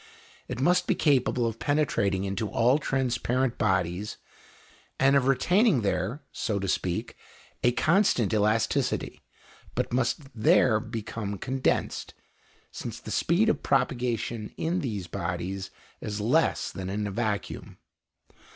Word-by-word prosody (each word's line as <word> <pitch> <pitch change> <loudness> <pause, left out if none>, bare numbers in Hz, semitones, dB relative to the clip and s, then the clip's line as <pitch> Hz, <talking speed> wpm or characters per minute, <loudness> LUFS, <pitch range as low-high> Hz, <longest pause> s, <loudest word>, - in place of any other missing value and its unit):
It 125 -1 -5
must 180 +6 +3
be 195 - +2
capable 130 -6 +2
of 115 -1 -3
penetrating 120 -10 +1
into 100 +2 -2
all 125 +5 +3
transparent 130 -2 0
bodies, 95 +2 0 0.8
and 135 +1 +5
of 135 -2 +3
retaining 180 - +3
there, 100 +8 -1
so 105 - -2
to 100 0 -2
speak, 90 -1 -2 0.5
a 120 - +5
constant 145 - +2
elasticity, 105 +1 +1 0.5
but - - -1
must 130 +4 +1
there 110 0 +4
become 110 -2 -5
condensed, 130 +7 -1 0.6
since - - -6
the - - -8
speed 180 +7 +2
of 225 - +1
propagation 120 -4 -1
in 170 +3 0
these 105 - -3
bodies 95 +3 -4 0.3
is 105 0 -4
less 125 +10 +1
than 95 -1 -5
in 105 +2 -2
a 100 - -3
vacuum. 105 -1 -3
120 Hz, 125 wpm, -27 LUFS, 105-135 Hz, 0.8 s, and